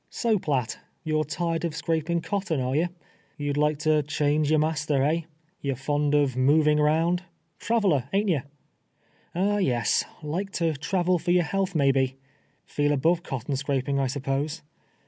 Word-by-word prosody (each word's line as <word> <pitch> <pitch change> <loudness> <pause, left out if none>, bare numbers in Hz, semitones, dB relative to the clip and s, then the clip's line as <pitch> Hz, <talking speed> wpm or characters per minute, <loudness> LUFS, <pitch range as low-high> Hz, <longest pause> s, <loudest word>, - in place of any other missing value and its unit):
'' - - -43
So, 225 -3 +3
Phitt, 130 -8 -1 0.3
you're 155 -1 +1
tired 165 +2 -2
of 165 -2 -2
scraping 165 +1 -1
cotton, 190 -6 -2
are 130 +1 -1
you? 170 +4 +2 0.5
You 145 -1 -3
would 145 - -1
like 150 0 +2
to 155 0 +3
change 145 0 0
your 155 - +4
master, 150 -2 +1
eh? 160 +4 +2 0.4
You're 140 -2 -1
fund 145 +3 0
ut" 140 -4 +2
moving 150 +3 +4
round 165 +4 +2 0.2
— 165 +1 -45
traveler 190 - +1
— - - -34
ain't 205 +2 +1
ye? 160 -6 +2 1.0
Ah, 200 +3 +1
yes 125 - +2
— - - -24
like 175 +7 -3
to 165 -2 +1
travel 175 +4 0
for 175 +2 -4
your 175 0 +4
health, 190 +4 -1
may 140 -3 +4
be? 130 -1 +1 0.5
Feel 145 0 0
above 165 +5 +2
cotton 135 -3 -4
scraping, 140 0 -1
I 135 - +1
'spose. 140 +4 -2
150 Hz, 180 wpm, -26 LUFS, 140-170 Hz, 1.0 s, your